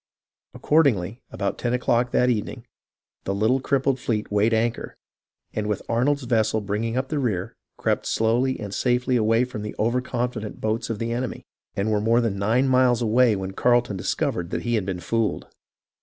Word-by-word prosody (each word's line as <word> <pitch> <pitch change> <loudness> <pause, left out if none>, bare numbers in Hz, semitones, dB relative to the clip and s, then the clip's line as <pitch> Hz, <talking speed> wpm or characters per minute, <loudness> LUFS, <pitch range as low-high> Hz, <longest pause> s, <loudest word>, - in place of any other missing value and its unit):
Accordingly, 120 - +2
about 100 -1 -3
ten 120 0 0
o'clock 120 0 +1
that 125 - +2
evening, 120 +1 -2 0.6
the 95 - -1
little 110 +6 +2
crippled 135 0 0
fleet 110 -4 -2
weighed 105 +2 +3
anchor, 115 +1 -1 0.6
and 105 -1 -2
with 105 -2 -2
Arnold's 135 +5 +1
vessel 110 -3 +1
bringing 110 +4 -2
up 130 +1 -1
the 150 - -1
rear, 105 -9 -2 0.2
crept - - -1
slowly 120 +4 +1
and 100 -2 -6
safely 125 +2 +1
away 115 +1 +3
from 125 -4 -5
the 105 - -6
over 120 +3 +1
confident 120 -4 -4
boats 110 +1 -2
of 115 - -2
the 115 +2 -3
enemy, 120 +1 -3 0.3
and 100 +2 0
were 105 -1 +1
more 115 +2 +3
than 110 -5 -1
nine 115 +7 +2
miles 125 -2 +3
away 115 0 +4
when 95 -1 -4
Carleton 120 0 +2
discovered 90 -1 -2
that - - -3
he 120 - -1
had 105 -5 0
been 95 -2 -3
fooled. 115 +5 -1
115 Hz, 180 wpm, -24 LUFS, 105-125 Hz, 0.6 s, away